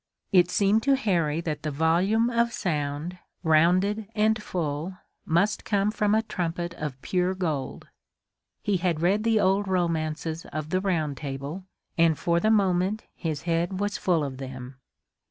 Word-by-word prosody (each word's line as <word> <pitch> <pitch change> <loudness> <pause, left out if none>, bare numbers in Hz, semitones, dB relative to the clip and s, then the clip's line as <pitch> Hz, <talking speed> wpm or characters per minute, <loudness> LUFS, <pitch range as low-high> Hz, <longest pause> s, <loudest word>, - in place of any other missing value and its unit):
It 180 -3 +5
seemed 205 +3 +3
to 275 +3 +3
Harry 170 - 0
that 155 -3 -3
the 155 - -2
volume 180 +10 +2
of 235 0 +2
sound, 150 +1 -2 0.2
rounded 185 +6 +3
and 215 0 +2
full, 170 -1 -3 0.3
must 175 +6 +2
come 205 0 +1
from 210 -1 +1
a 220 - +2
trumpet 175 -4 -3
of 150 -5 -5
pure 185 0 0
gold. 155 -8 -3 0.8
He 200 -2 +1
had 170 -3 -1
read 200 +4 +2
the 225 -1 +3
old 195 +1 +2
romances 165 -3 -1
of 155 0 -5
the 185 - +1
Round 160 -7 0
Table, 140 +6 -5 0.3
and 165 -2 +4
for 170 0 +1
the 215 - +2
moment 195 0 +2
his 155 -4 -4
head 170 +2 0
was 205 0 -1
full 170 -4 +2
of 135 -2 -4
them. 130 -1 -8
175 Hz, 155 wpm, -26 LUFS, 155-200 Hz, 0.8 s, It